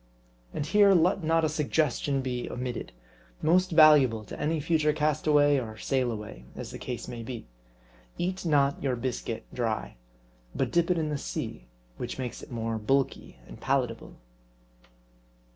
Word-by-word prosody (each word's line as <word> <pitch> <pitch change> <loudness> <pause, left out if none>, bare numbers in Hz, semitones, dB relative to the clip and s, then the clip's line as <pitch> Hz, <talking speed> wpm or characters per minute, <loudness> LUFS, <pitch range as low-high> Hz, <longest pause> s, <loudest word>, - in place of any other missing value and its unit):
And 145 - -3
here 200 +3 +5
let 180 +2 +3
not 165 0 +2
a - - +3
suggestion 150 -2 0
be 125 -2 -3
omitted, 125 -1 -4 0.5
most 180 +4 +4
valuable 150 - +6
to - - -8
any 160 +1 0
future 155 0 +2
castaway 150 -1 +3
or 110 -3 -6
sailaway 110 - -2
as - - -7
the - - -8
case 125 -2 -5
may 120 -1 -6
be. 120 0 -7 0.7
Eat 185 +2 -2
not 140 -4 +2
your 135 -3 0
biscuit 120 -2 -4
dry; 110 - -2 0.6
but - - 0
dip 170 0 +2
it 180 - +2
in 155 -2 -1
the 145 -1 -2
sea: - - -5 0.3
which - - -5
makes 125 -2 -5
it - - -11
more 115 -2 -3
bulky 135 - -1
and - - -12
palatable. 130 -4 -1
140 Hz, 150 wpm, -28 LUFS, 120-155 Hz, 0.7 s, valuable